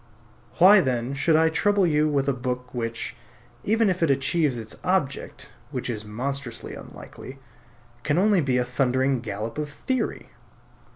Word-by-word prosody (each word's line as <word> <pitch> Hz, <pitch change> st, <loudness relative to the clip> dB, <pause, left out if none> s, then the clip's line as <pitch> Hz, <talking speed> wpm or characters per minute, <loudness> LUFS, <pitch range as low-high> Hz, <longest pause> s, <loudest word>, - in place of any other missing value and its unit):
Why 190 Hz, +4 st, +8 dB
then 125 Hz, -2 st, -1 dB
should 155 Hz, +3 st, +2 dB
I 160 Hz, +1 st, +4 dB
trouble 200 Hz, +4 st, +2 dB
you 155 Hz, -2 st, +2 dB
with 140 Hz, -2 st, 0 dB
a 140 Hz, -, +2 dB
book 125 Hz, 0 st, -4 dB
which, 115 Hz, -2 st, -4 dB, 0.5 s
even 225 Hz, +1 st, +2 dB
if 185 Hz, -2 st, 0 dB
it 165 Hz, -, +3 dB
achieves 140 Hz, 0 st, +1 dB
its 110 Hz, -2 st, -7 dB
object 180 Hz, -7 st, -2 dB, 0.2 s
(which -, -, -3 dB
is 105 Hz, -2 st, -5 dB
monstrously 120 Hz, +3 st, -4 dB
unlikely) 130 Hz, +1 st, -10 dB, 0.6 s
can 145 Hz, +4 st, 0 dB
only 200 Hz, -1 st, +4 dB
be 130 Hz, -3 st, +1 dB
a 125 Hz, -, +1 dB
thundering 130 Hz, +1 st, +1 dB
gallop 110 Hz, +3 st, -5 dB
of 150 Hz, -1 st, -3 dB
theory? 255 Hz, -, -3 dB
140 Hz, 155 wpm, -25 LUFS, 125-165 Hz, 0.6 s, Why